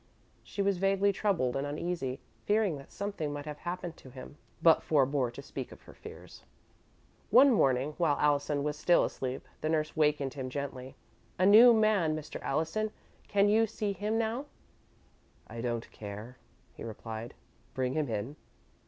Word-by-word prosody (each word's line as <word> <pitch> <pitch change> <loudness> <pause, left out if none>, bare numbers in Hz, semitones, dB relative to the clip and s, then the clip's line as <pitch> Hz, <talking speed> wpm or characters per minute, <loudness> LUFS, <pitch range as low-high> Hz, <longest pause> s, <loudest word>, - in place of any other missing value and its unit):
She 200 - -3
was 195 -2 +1
vaguely 195 +1 +2
troubled 180 -12 0
and 135 +1 -1
uneasy, 150 -3 -3 0.3
fearing 210 -5 +2
that 140 - -14
something 200 -7 -4
might 145 0 -6
have 150 -1 -7
happened 175 -1 -5
to 130 - -14
him, 130 +2 -11 0.2
but 165 -1 +5
forebore 140 -4 +2
to 120 - -10
speak - - -7
of - - -14
her - - -14
fears. - - -12 0.9
One 265 +5 +7
morning, 135 - +2
while 155 -4 +2
Allison 145 -1 +1
was 150 0 -3
still 175 +2 +4
asleep, 130 0 -5
the 155 - -1
nurse 155 -1 0
wakened 150 -3 +1
him 130 -2 -5
gently. 130 -1 -6 0.4
"A 185 - +3
new 220 +5 +9
man, 215 -8 +3
Mr. 155 -1 -7
Allison; 165 +8 -1 0.4
can 200 0 +3
you 220 +2 +4
see 210 -1 -3
him 210 +4 -1
now?" 230 +5 -1 1.0
"I 115 +1 -7
don't 120 -1 -3
care," 105 +4 -9 0.3
he - - -10
replied. 115 +1 -7 0.4
"Bring 130 -1 -1
him 150 -3 -1
in." 115 +7 -4
155 Hz, 160 wpm, -30 LUFS, 130-200 Hz, 1.0 s, new